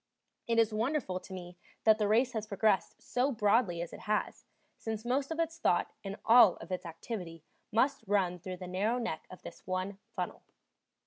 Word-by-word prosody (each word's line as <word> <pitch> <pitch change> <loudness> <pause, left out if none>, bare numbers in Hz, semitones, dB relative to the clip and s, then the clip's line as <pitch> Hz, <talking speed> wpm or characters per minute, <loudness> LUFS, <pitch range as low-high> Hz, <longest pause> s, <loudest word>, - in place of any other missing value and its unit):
It 230 -1 +1
is 225 -1 +4
wonderful 225 -4 0
to 190 - -14
me 180 -1 -8 0.3
that 220 0 +5
the 210 - +2
race 240 +5 +3
has 220 -2 -3
progressed 200 0 +1
so 255 +3 +1
broadly 205 -6 +2
as 170 - -9
it - - -8
has, 210 0 -2 0.3
since 220 0 -5
most 265 +3 0
of 325 0 -4
its 330 0 -1
thought 175 - +2
and 195 -1 -4
all 225 -5 +8
of - - -11
its 180 -1 -3
activity 165 -1 -6 0.3
must 255 +2 +2
run 185 -3 +1
through 185 +1 -6
the 180 0 -7
narrow 200 +7 0
neck 230 -10 -3
of 185 - -12
this - - -10
one 185 +2 -2 0.2
funnel. - - -3
210 Hz, 190 wpm, -32 LUFS, 185-235 Hz, 0.3 s, all